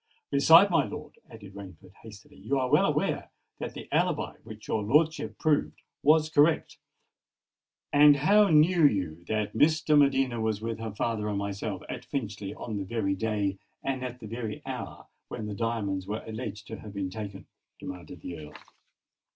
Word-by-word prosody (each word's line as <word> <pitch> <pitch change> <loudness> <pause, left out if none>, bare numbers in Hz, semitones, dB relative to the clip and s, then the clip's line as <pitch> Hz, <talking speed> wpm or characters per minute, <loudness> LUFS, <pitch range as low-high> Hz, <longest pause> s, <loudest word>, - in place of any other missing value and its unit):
Besides, 165 +7 +7
my 165 -4 +4
lord," - - -8
added 100 -3 -12
Rainford 95 -2 -12
hastily, 105 -2 -14
"you 110 +8 -1
are 130 -1 -1
well - - +5
aware - - -1 0.3
that - - -5
the - - -8
alibi - - 0
which 110 -1 -11
your 110 - 0
lordship 135 -1 +1
proved 155 -2 0 0.2
was 155 +1 +4
correct." 155 +1 +2 1.1
"And 145 0 +8
how 205 +8 +5
knew 165 +2 +5
you 90 - -2
that 105 0 -2
Miss 155 +6 +4
de 155 - +3
Medina 135 -4 +3
was 110 -2 0
with 115 0 -4
her 115 0 -4
father 105 -1 -1
and 105 - -2
myself 100 0 -4
at 125 0 -6
Finchley 105 -7 -4
on 110 -3 -5
the 100 - -3
very 100 -1 -1
day, 100 -1 -1 0.2
and 130 -1 -2
at 125 -1 -6
the 115 - -9
very 115 -1 -5
hour, - - -6 0.2
when 110 - -6
the 105 - -4
diamonds 100 -4 -2
were 105 +2 -4
alleged 110 -2 -6
to 110 - -6
have 105 -1 -10
been 95 -2 -3
taken?" 100 -2 -7 0.3
demanded - - -9
the 85 -2 -7
Earl. 75 -1 -11
110 Hz, 175 wpm, -28 LUFS, 100-140 Hz, 1.1 s, And